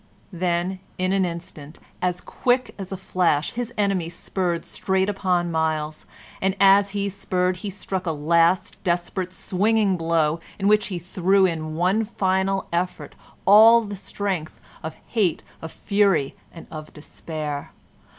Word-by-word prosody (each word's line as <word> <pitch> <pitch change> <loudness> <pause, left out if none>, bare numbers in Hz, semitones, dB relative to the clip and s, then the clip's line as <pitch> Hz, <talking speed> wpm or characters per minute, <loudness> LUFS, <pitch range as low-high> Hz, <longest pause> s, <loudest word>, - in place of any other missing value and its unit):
Then 175 +1 -1 0.2
in 185 +1 0
an 195 -1 +2
instant, 170 -3 -7 0.2
as 180 -1 -1
quick 250 0 0
as 195 -1 -6
a 190 - -3
flash, 175 -5 +1
his 245 0 -4
enemy 195 -5 +1
spurred 175 -1 -2
straight 190 0 0
upon 180 -3 0
Myles, 155 -1 -1 0.3
and 190 0 +1
as 195 +1 +6
he 200 0 0
spurred 185 -2 -1
he 205 +2 -5
struck 190 -1 -4
a - - +2
last 165 +4 +2
desperate, 180 +1 -1
swinging 200 +1 +1
blow, 165 -1 +1 0.2
in 195 - 0
which 210 0 +4
he 190 -4 -4
threw 185 +3 +2
in 155 -3 -2
one 185 +6 +2
final 190 -2 0
effort 180 +1 -2 0.3
all 225 +4 +8
the 205 -2 -6
strength 190 -4 -4 0.2
of 160 0 -6
hate, 200 -8 +1 0.2
of 160 - -7
fury, 195 -9 +1 0.2
and 165 - -11
of 155 -1 -8
despair. 150 -1 -6
185 Hz, 145 wpm, -23 LUFS, 165-195 Hz, 0.3 s, all